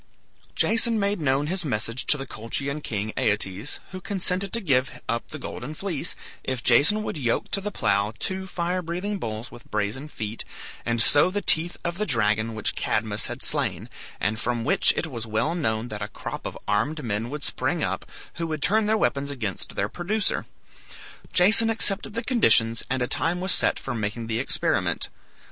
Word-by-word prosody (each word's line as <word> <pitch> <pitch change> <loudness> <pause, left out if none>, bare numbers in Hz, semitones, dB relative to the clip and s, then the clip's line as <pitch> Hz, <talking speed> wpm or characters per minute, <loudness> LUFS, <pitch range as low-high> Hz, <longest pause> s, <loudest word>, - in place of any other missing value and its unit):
Jason 230 0 +3
made 200 -1 0
known 140 0 +2
his 185 +4 0
message 115 -3 -1
to 150 - +8
the 135 - -5
Colchian 140 +6 -3
king, 110 -4 -3
Aeetes, 100 +3 -1
who 185 -1 -7
consented 195 -1 -1
to 230 - 0
give 130 - +1
up 115 0 -1
the 155 - -7
golden 150 +1 -6
fleece 175 -5 -2 0.3
if 130 -3 -3
Jason 210 +9 +4
would 175 - -4
yoke 120 -5 -1
to 195 - +1
the 210 - -2
plough 100 - +1
two 190 - -3
fire 180 0 -1
breathing 180 +4 -3
bulls 110 -1 -5
with 120 - -14
brazen 105 +7 -2
feet, 110 -6 -3 0.4
and 120 0 +1
sow 145 +5 +5
the 200 +2 -1
teeth 170 +2 +5
of 170 +2 -2
the 210 - 0
dragon 110 -2 +2
which 110 - +1
Cadmus - - 0
had - - -4
slain, - - -1 0.3
and 105 +1 0
from 120 -1 -1
which 180 +10 +4
it - - 0
was 120 -7 -5
well 110 +9 0
known 115 -8 -1
that 105 -1 -6
a 105 - -2
crop - - -6
of - - -7
armed 150 +10 0
men 110 0 -2
would 150 +2 -5
spring - - -1
up, - - -3 0.3
who 165 - -2
would 155 -2 -3
turn 215 +2 +3
their 220 +1 +3
weapons 140 -8 0
against 110 -10 -3
their - - 0
producer. 205 +5 0 0.8
Jason 210 +5 +6
accepted 210 -1 +3
the 230 - -1
conditions, 115 - +4
and 130 -1 0
a - - 0
time 170 +6 0
was 185 +1 0
set - - +2
for 135 - -4
making 115 +1 -3
the 115 0 -1
experiment. 130 - 0
140 Hz, 190 wpm, -25 LUFS, 115-185 Hz, 0.8 s, to